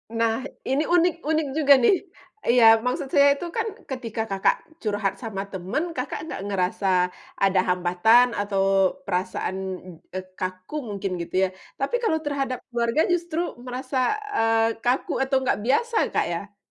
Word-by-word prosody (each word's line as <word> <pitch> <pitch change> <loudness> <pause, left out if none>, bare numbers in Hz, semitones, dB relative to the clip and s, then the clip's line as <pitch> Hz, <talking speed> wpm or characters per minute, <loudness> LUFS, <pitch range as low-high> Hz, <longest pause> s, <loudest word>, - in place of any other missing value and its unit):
Nah, 230 0 +1 0.2
ini 270 +3 +1
unik 350 0 +4
unik 315 -1 +1
juga 285 -2 +6
nih! 380 - +6 0.5
Iya, 240 0 +5 0.2
maksud 250 +2 -1
saya 280 0 +6
itu 350 - -6
kan 450 0 0 0.2
ketika, 230 -4 -4
Kakak, 195 -1 +2 0.3
curhat 205 -2 -1
sama 215 -5 -4
teman, 190 - -2
Kakak, 265 -4 -4
nggak 320 - -6
ngerasa 195 0 -1 0.6
ada 195 -1 +4
hambatan 180 +7 +4
atau 200 -1 0 0.4
perasaan, 185 +1 -2 0.6
eee, 185 - -3 0.2
kaku 185 +7 -5
mungkin 200 -1 -3
gitu 170 - -7
ya. - - +3 0.3
Tapi 275 - 0
kalau 320 -8 +2
terhadap 275 -3 -2
keluarga 235 +5 +1
justru 340 -2 -2 0.3
merasa, 255 +2 -4 0.4
eee, 225 0 +2
kaku 250 +2 +1
atau 265 0 -1
nggak 245 - +1
biasa, 460 - +1 0.2
Kak, - - +2
ya. 200 +4 -6
235 Hz, 145 wpm, -24 LUFS, 195-280 Hz, 0.6 s, juga